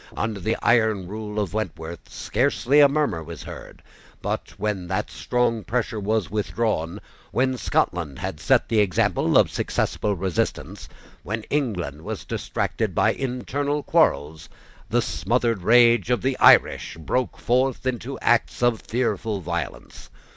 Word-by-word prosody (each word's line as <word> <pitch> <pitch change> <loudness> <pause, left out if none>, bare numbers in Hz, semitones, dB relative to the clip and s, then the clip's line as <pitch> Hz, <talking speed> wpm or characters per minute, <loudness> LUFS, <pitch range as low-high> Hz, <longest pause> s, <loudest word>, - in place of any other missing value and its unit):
Under 110 -2 -2
the 110 +5 -1
iron 110 -5 +3
rule 105 +1 -5
of 100 -3 -2
Wentworth, 85 -6 -5
scarcely 135 +3 +1
a 145 -1 +8
murmur 140 - 0
was - - -9
heard: - - -10 0.4
but, - - -3
when 105 -4 -2
that - - -2
strong 120 -3 0
pressure 115 -2 -2
was 105 0 0
withdrawn, 105 -4 -1 0.3
when 130 +3 +1
Scotland 85 - -1
had 95 -5 -5
set - - +3
the 110 -1 +2
example 100 -4 +2
of - - +4
successful 105 -1 -1
resistance, 95 -2 -3 0.3
when 110 +3 -4
England 95 - -2
was - - -6
distracted - - -2
by - - +3
internal 140 +3 -2
quarrels, 80 - +1 0.4
the - - +2
smothered 115 -4 0
rage 120 +4 +5
of 125 -1 +1
the 135 0 +1
Irish - - +5
broke 125 +10 -2
forth 130 +1 0
into 130 +1 -3
acts 120 +1 +1
of 120 -2 +2
fearful 110 -3 -1
violence. 85 -8 -6
110 Hz, 140 wpm, -24 LUFS, 90-125 Hz, 0.4 s, a